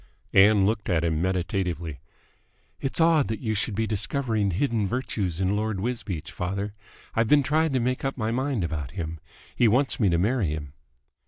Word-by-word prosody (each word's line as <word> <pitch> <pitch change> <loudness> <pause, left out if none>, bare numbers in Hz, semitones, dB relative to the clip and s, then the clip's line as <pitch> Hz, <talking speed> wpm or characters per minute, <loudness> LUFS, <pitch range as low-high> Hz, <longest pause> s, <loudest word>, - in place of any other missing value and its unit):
Ann 100 0 +6
looked 105 0 -1
at 85 -3 +2
him 80 -1 0
meditatively. 90 - -2 0.8
"It's 135 - -2
odd 160 -3 +4
that 110 - -3
you 110 -3 -1
should 105 0 -2
be 110 +2 0
discovering 110 0 0
hidden 110 +2 0
virtues 100 -7 -2
in 95 +1 +1
Lord 105 -2 -1
Wisbeach, 105 -7 -3
father. 100 +3 -3 0.4
I've 115 0 +2
been 145 +3 +5
trying 155 +3 +2
to 130 - +2
make 125 +2 -1
up 135 0 -2
my 110 -2 -1
mind 130 -3 -1
about 75 -4 -3
him. 80 -2 -4 0.4
He 120 - +4
wants 130 +5 +2
me 105 -5 +4
to 85 - +2
marry 105 +3 +1
him." 75 -2 -4
105 Hz, 180 wpm, -26 LUFS, 90-125 Hz, 0.8 s, Ann